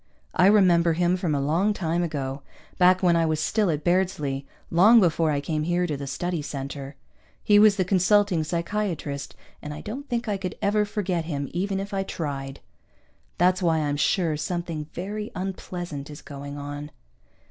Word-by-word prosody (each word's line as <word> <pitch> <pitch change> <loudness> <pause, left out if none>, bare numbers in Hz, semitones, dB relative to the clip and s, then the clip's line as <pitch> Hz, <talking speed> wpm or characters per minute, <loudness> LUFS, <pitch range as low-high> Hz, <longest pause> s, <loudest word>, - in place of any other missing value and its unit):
I 180 - +5
remember 175 -5 +5
him 175 +2 +2
from 175 -5 -1
a - - 0
long 165 +9 +1
time 170 -3 -1
ago, 140 -5 -3 0.4
back 185 +1 +5
when 175 -2 +4
I 165 -1 +2
was 155 -1 0
still 210 +4 +1
at 150 -2 -1
Bairdsley, 150 -7 0 0.2
long 210 +8 +7
before 165 -4 +2
I 145 -2 +1
came 155 +2 -2
here 175 +3 +1
to 155 -4 -2
the 140 0 -6
Study 175 +4 -2
Center. 140 -1 -6 0.5
He 205 -1 +5
was 210 -1 +6
the 190 -2 0
consulting 190 -1 +3
psychiatrist, 170 -4 -3 0.3
and 150 0 -6
I - - -8
don't 270 +7 -7
think 240 0 -2
I 205 -2 0
could 185 -2 -5
ever 210 +1 +2
forget 185 -5 -2
him, 145 -4 -3
even 195 +3 -1
if 200 +1 -6
I 195 - 0
tried! 140 -7 -5 0.8
That's 180 +2 +3
why 165 -3 +2
I'm 145 -2 0
sure 160 +2 +1
something 170 -2 -3
very 210 +4 -5
unpleasant 175 -6 -5
is 150 0 -10
going 140 0 -8
on. 145 +1 -6
170 Hz, 180 wpm, -25 LUFS, 150-190 Hz, 0.8 s, long